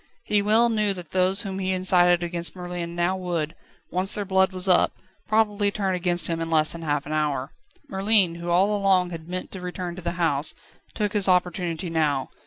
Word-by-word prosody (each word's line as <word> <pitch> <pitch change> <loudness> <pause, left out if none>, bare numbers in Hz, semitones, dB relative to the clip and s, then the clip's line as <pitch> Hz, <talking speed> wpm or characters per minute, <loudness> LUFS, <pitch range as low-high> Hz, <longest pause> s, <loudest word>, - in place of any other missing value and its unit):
He 205 -1 +1
well 220 +3 +4
knew 210 -3 +1
that 175 -4 -10
those 185 +3 +2
whom 195 -2 -5
he 190 0 -1
incited 180 -1 +3
against 170 0 -2
Merlin 175 -1 -5
now 175 +2 +1
would, 170 -4 -3 0.4
once 185 +2 +1
their 205 - -3
blood 190 0 +2
was 185 +1 -4
up, 180 - +4 0.3
probably 210 -1 +2
turn 200 -2 -1
against 175 -1 0
him 165 -1 -1
in 165 - -3
less 155 -1 +3
than 170 - -7
half 145 -3 -1
an 150 - -7
hour. 145 -3 -1 0.4
Merlin, 195 -2 +3
who 175 - -4
all 190 +4 +3
along 190 -3 +2
had 165 0 -8
meant 185 0 -5
to 190 - -8
return 180 -1 -5
to 185 - -8
the 170 0 -3
house, 160 -4 0 0.4
took 210 -2 -1
his 200 -3 +2
opportunity 180 -1 0
now. 150 -4 0
180 Hz, 200 wpm, -24 LUFS, 170-195 Hz, 0.4 s, well